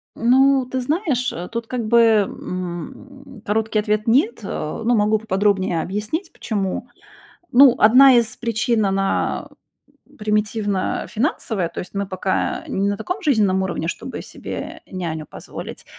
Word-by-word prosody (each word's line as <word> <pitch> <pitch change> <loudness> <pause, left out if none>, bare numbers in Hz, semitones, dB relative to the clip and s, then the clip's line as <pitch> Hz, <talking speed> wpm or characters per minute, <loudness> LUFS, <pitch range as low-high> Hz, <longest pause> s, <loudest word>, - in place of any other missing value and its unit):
Ну, 260 +2 +4
ты 260 - -1
знаешь, 270 - -1
э, 175 +2 -6
тут 230 0 -3
как 240 -4 -3
бы, 235 +1 +5 0.3
м, 210 - -8
короткий 220 +1 0
ответ 210 +1 -1
нет. 290 - +3
Э, - - -4
ну, 240 0 +3
могу 210 +1 +3
поподробнее 195 -5 0
объяснить 215 - -4
почему. 205 +2 -3 0.6
Ну, 260 0 +7
одна 255 +5 +7
из 230 -2 +1
причин, 230 -2 0
она 195 0 -1 0.7
примитивно 210 -2 -1
финансовая, 215 - -1
то - - -6
есть 180 - -9
мы 200 0 -2
пока 185 0 -2
не 195 +1 -1
на 205 - -1
таком 360 - -4
жизненном 210 - +2
уровне, 170 -3 -3
чтобы - - -5
себе - - -7
няню 165 -5 -4
позволить. - - -9
215 Hz, 140 wpm, -21 LUFS, 195-250 Hz, 0.7 s, Ну